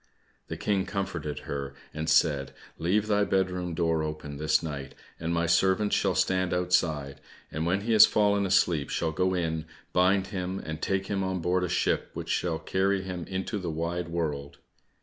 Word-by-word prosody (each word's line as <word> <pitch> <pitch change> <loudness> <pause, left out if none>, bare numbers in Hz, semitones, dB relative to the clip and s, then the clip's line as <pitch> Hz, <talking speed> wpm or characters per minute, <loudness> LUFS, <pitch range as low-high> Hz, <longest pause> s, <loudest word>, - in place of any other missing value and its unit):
The - - -5
King 100 -2 0
comforted 95 -7 -3
her 70 -1 -5 0.2
and 80 +1 -3
said, 70 -4 +3 0.3
"Leave 95 +6 +2
thy 105 -1 +2
bed 95 -2 +1
room 90 -2 -3
door 80 -1 +1
open 75 -2 -5
this 75 +1 +2
night, 70 -4 -6 0.2
and 80 +1 -2
my 85 0 +1
servants 95 +4 +3
shall 95 -2 +1
stand 95 -1 +1
outside, 80 -6 0 0.3
and 80 +2 -2
when 95 +3 +1
he 115 +2 0
has 110 - +9
fallen 100 -1 +2
asleep 85 -6 +2
shall 80 -1 -1
go 90 +4 +1
in, 80 -2 -1 0.3
bind 95 +2 +3
him, 95 0 -2
and 80 -4 -6
take 95 0 0
him 95 -1 -1
on 95 -1 -1
board 90 +2 +1
a 90 - -1
ship 90 - 0
which - - -5
shall 85 -3 0
carry 95 +3 0
him 90 -3 -5
into 95 +3 -3
the 90 -3 -4
wide 85 +2 -2
world." 75 -4 -3
90 Hz, 185 wpm, -28 LUFS, 80-95 Hz, 0.3 s, has